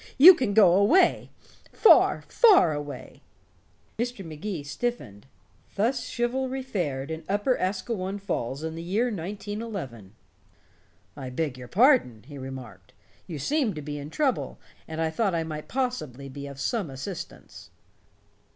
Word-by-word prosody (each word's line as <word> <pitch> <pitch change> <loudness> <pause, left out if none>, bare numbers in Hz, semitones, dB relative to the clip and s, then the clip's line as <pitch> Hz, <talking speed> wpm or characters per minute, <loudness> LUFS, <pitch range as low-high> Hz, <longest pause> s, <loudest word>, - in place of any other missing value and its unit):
You 345 +8 +11
can 255 - -1
go 195 -6 +7
away 210 - +4 0.4
far, - - +5
far 390 - +5
away." 145 -3 -7 0.8
Mr. 240 -5 -3
Magee 160 +1 -5
stiffened. 140 - -4 0.5
Thus 240 +5 0
chivalry 260 +2 -2
fared 155 - -3
in 160 +1 -5
Upper 205 +6 +1
Asquewan 190 +1 -2
Falls 140 - -3
in 160 0 -3
the 165 - -6
year 210 +8 0
1911. 195 - -6 1.0
"I 135 -3 -6
beg 140 +1 -2
your 125 -1 -10
pardon," 195 - +3
he 145 0 -10
remarked. 125 -8 -9 0.3
"You 165 - -5
seemed 245 - 0
to 150 - -6
be 145 0 -5
in 145 +1 -7
trouble, 275 - -1 0.3
and 160 0 -6
I 160 -1 0
thought 195 +1 0
I 165 - 0
might 155 -1 -6
possibly 245 - -3
be 140 +1 -8
of 140 -1 -10
some 200 +2 -1
assistance." 135 +7 -8
175 Hz, 140 wpm, -26 LUFS, 140-235 Hz, 1.0 s, You